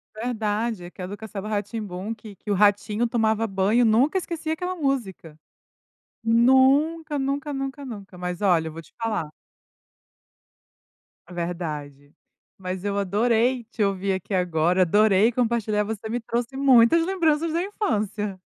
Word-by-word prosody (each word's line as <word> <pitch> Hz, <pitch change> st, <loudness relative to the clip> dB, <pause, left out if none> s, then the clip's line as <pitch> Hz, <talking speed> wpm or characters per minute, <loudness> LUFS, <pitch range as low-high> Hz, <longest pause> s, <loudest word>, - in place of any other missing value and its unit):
Verdade. 220 Hz, -3 st, -2 dB
É -, -, -8 dB
que 185 Hz, -, -12 dB
a 180 Hz, -, -4 dB
do 205 Hz, +2 st, -7 dB
Castelo 215 Hz, -2 st, -7 dB
Rá-Tim-Bum, 205 Hz, 0 st, -4 dB
que 210 Hz, -2 st, -12 dB
que 210 Hz, -, -11 dB
o -, -, +3 dB
ratinho 205 Hz, +3 st, +2 dB
tomava 225 Hz, -1 st, +1 dB
banho, 200 Hz, +4 st, +2 dB
nunca 255 Hz, -, +3 dB
esqueci 335 Hz, -3 st, -4 dB
aquela 360 Hz, +3 st, -2 dB
música. 235 Hz, -, -3 dB, 0.9 s
Nunca, 270 Hz, +7 st, +3 dB
nunca, 280 Hz, +2 st, -2 dB
nunca, 275 Hz, +1 st, -4 dB
nunca. 200 Hz, -7 st, -9 dB
Mas, 180 Hz, 0 st, -4 dB
olha, 170 Hz, -5 st, +2 dB
eu -, -, -9 dB
vou 165 Hz, -, -8 dB
te -, -, -22 dB
falar. 215 Hz, -10 st, -3 dB, 2.0 s
É 180 Hz, -, -12 dB
verdade. 150 Hz, -5 st, -5 dB, 0.4 s
Mas 185 Hz, 0 st, -5 dB
eu 200 Hz, 0 st, -1 dB
adorei 230 Hz, +5 st, +1 dB
te 225 Hz, -2 st, -2 dB
ouvir 195 Hz, 0 st, 0 dB
aqui 190 Hz, +2 st, -5 dB
agora, 180 Hz, 0 st, +2 dB
adorei 210 Hz, +4 st, +4 dB
compartilhar 225 Hz, -3 st, 0 dB
você 220 Hz, 0 st, -5 dB
me 240 Hz, +2 st, -2 dB
trouxe 235 Hz, +3 st, -3 dB
muitas 270 Hz, +3 st, +5 dB
lembranças 330 Hz, -4 st, +1 dB
da 335 Hz, -, 0 dB
infância. 210 Hz, -, -2 dB
220 Hz, 145 wpm, -24 LUFS, 190-255 Hz, 2.0 s, muitas